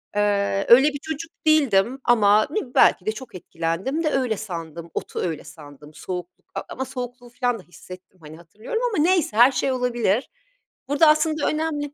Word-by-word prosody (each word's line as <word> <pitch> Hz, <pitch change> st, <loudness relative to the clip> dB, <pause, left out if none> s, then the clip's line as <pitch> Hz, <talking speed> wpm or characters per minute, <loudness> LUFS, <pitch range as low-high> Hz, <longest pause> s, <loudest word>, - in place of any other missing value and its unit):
Eee, 200 Hz, -1 st, +1 dB
öyle 265 Hz, +5 st, +8 dB
bir 285 Hz, -1 st, -7 dB
çocuk 315 Hz, +1 st, -6 dB, 0.2 s
değildim 260 Hz, -5 st, +3 dB
ama 215 Hz, -3 st, +4 dB
ne 430 Hz, -, -1 dB
bi 245 Hz, -, -12 dB
belki 180 Hz, -, +4 dB
de 215 Hz, -, +1 dB
çok 235 Hz, -3 st, -10 dB
etkilendim 175 Hz, -, -3 dB
de 310 Hz, -, +1 dB
öyle 250 Hz, -6 st, 0 dB
sandım, 170 Hz, -4 st, -7 dB
otu -, -, -5 dB
öyle 165 Hz, -4 st, -3 dB
sandım. 150 Hz, -1 st, -14 dB
Soğukluk, 180 Hz, +1 st, -8 dB
eee, -, -, -3 dB
ama 265 Hz, -, -4 dB
soğukluğu 245 Hz, -1 st, -7 dB
filan 245 Hz, -2 st, -2 dB
da -, -, -14 dB
hissettim, 185 Hz, +1 st, -14 dB
hani, 155 Hz, +1 st, -11 dB
hatırlıyorum 215 Hz, -, -6 dB
ama 300 Hz, -, +2 dB
neyse, 335 Hz, -, +1 dB
her 245 Hz, +3 st, +7 dB
şey 270 Hz, -, -1 dB
olabilir. 240 Hz, -3 st, 0 dB, 0.6 s
Burada 290 Hz, +2 st, +4 dB
aslında 310 Hz, 0 st, +2 dB
önemli 300 Hz, -2 st, -2 dB
240 Hz, 175 wpm, -23 LUFS, 185-285 Hz, 0.6 s, öyle